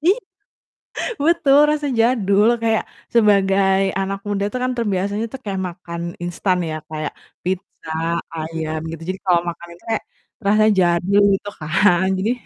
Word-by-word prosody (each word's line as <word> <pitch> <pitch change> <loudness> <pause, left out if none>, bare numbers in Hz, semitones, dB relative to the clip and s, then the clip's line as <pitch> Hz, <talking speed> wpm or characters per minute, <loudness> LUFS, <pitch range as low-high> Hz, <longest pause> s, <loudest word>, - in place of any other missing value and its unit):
Iya, 390 +6 +5 1.1
betul 300 -4 +4
rasa 300 -1 -1
jadul, 215 -3 +3 0.2
kayak 225 -1 +2 0.3
sebagai 195 -3 +4 0.2
anak 195 0 -2
muda 200 -1 0
tuh 255 - -3
kan 255 - 0
terbiasanya 205 -1 -1
tuh, 265 - -6
kayak 195 -2 -2
makan 170 -1 -8 0.2
instan 180 +2 0
ya, 155 - -3
kayak 155 -1 -4 0.3
pizza, 185 -3 -4 0.4
ayam, 160 0 -3
gitu. 165 -1 -8
Jadi, 190 0 -3
kalau 175 -2 +4
makan 170 0 -8
itu 175 - -23
kayak, 225 - 0 0.4
rasa 215 +1 +4
jadul, 180 +3 +3
gitu 205 +1 -6
kan. 175 +3 +3
Jadi 210 +5 +1
195 Hz, 145 wpm, -20 LUFS, 175-215 Hz, 1.1 s, Iya